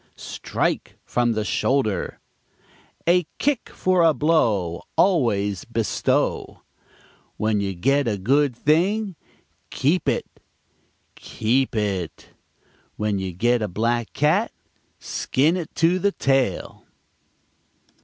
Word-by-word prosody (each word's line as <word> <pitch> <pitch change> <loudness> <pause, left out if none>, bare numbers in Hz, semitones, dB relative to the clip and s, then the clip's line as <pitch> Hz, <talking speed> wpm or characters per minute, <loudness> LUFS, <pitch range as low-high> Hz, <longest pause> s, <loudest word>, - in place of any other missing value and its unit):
"Strike - - -3
from 120 -1 +1
the 110 -1 -2
shoulder." 110 -4 0 0.9
"A 175 -1 +3
kick 285 -4 0
for 185 -1 +1
a 165 -2 +4
blow, 110 - +1 0.2
always 105 - +2
bestow." 115 -2 -1 0.7
"When 110 -1 +1
you 95 -1 -2
get 135 +8 +1
a 105 -3 0
good 135 +6 +2
thing, 185 - +1 0.5
keep 160 +7 +1
it - - -1 0.9
keep 125 +3 -1
it." 100 -5 -3 0.7
"When 105 -2 -1
you 95 -1 -3
get 120 +7 +1
a 105 - 0
black 115 +4 -1
cat, 165 +10 +2 0.5
skin 150 +6 0
it 175 -4 -5
to 170 +3 +3
the 200 +2 +2
tail." 135 -7 0
125 Hz, 105 wpm, -23 LUFS, 105-165 Hz, 0.9 s, a